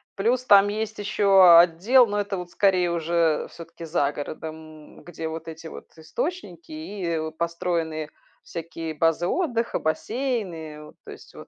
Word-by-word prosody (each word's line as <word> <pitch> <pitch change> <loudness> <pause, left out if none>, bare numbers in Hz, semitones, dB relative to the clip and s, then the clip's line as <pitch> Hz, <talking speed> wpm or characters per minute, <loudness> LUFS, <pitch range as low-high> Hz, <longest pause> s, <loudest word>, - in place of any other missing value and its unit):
Плюс 235 +5 0
там 200 -2 +6
есть 215 +1 -4
еще 195 -4 +6
отдел, 180 +10 +5
но 205 -2 -2
это 200 -1 -3
вот 180 -1 -7
скорее 185 -3 +2
уже, 165 -1 0
всё-таки, 170 0 -11
за 145 -3 0
городом, 155 +1 -9
где 165 -2 -6
вот 160 +1 -7
эти 160 0 -9
вот - - -10
источники 170 - -5
и, 180 +5 -7
э, 165 -2 -1
вот 160 0 -6
построенные 165 -2 -2 0.3
всякие 165 -1 -6
базы 165 +2 +1
отдыха, 235 - -1
бассейны. 170 - -3
Вот, - - -16
то - - -9
есть, - - -14
вот. - - -12
170 Hz, 155 wpm, -24 LUFS, 160-205 Hz, 0.3 s, там